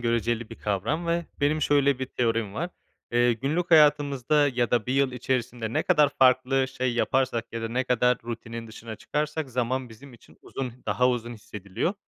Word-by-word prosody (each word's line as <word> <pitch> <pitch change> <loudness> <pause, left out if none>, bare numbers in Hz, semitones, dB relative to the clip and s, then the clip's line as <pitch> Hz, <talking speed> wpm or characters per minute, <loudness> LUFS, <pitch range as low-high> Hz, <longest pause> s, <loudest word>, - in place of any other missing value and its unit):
göreceli 115 -1 -1
bir - - -7
kavram 110 - -2
ve 170 0 0
benim 155 +2 +1
şöyle 140 -2 +3
bir 130 - -3
teorim 115 -5 -1
var. 170 +7 -3 0.4
Eee, 120 0 +4
günlük 150 +10 -2
hayatımızda 145 -2 +4
ya 120 -3 -1
da 120 -3 +1
1 125 - -1
yıl 135 -1 +2
içerisinde 120 -2 -2
ne 155 - +1
kadar 150 -5 +4
farklı 130 0 +4
şey 130 -1 -2
yaparsak 125 -1 0
ya 115 0 -4
da 115 - -2
ne 125 +2 -1
kadar 125 0 +2
rutinin 115 0 -6
dışına 110 0 -9
çıkarsak 150 +4 -3
zaman 125 +1 -1
bizim 125 +5 -14
için 115 - -20
uzun 130 -3 -5
daha 125 0 +2
uzun 120 -1 -2
hissediliyor. 105 - -4
125 Hz, 180 wpm, -26 LUFS, 115-140 Hz, 0.4 s, Eee